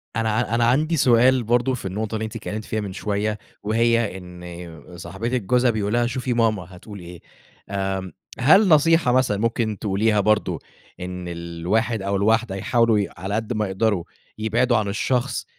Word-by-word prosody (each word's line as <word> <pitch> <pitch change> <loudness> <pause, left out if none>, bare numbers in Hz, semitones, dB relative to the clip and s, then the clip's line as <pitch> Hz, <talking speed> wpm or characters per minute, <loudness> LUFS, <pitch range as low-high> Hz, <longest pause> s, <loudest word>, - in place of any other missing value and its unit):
أنا 110 0 0
أنا 120 0 +2
عندي 155 +7 +2
سؤال 125 0 +4
برضه 120 +3 +1
في 115 - -6
النقطة 105 +3 -3
اللي 110 0 -2
أنتِ 110 - -8
اتكلِّمتِ 110 -1 -5
فيها 110 -1 -2
من 100 -2 -5
شوية 105 +1 -2 0.3
وهي 115 -2 +1
إن 90 -2 -10
صاحبتِك 115 +8 -3
جوزها 125 +4 +3
بيقول 105 0 -2
لها: 120 0 +2
"شوفي 125 0 -2
ماما 110 -6 +1
هتقول 100 +2 -11
إيه." 85 0 -11 0.5
آمم 95 -1 -3 0.3
هل 190 - +6
نصيحة 165 -3 +4
مثلًا 125 -5 +2
ممكن 115 -1 -1
تقوليها 105 +1 +1
برضه، 105 +1 +1 0.4
إن 90 0 -6
الواحد 85 +7 -2
أو 100 +1 -1
الواحدة 110 0 +1
يحاولوا 115 +2 +2
ي 100 - -1
على 95 +4 -3
قد 110 +2 -2
ما 110 -2 -1
يقدروا 95 -1 0 0.3
يبعدوا 115 +3 +1
عن 105 -2 -1
الشخص، 125 +5 -1
110 Hz, 165 wpm, -22 LUFS, 95-120 Hz, 0.5 s, هل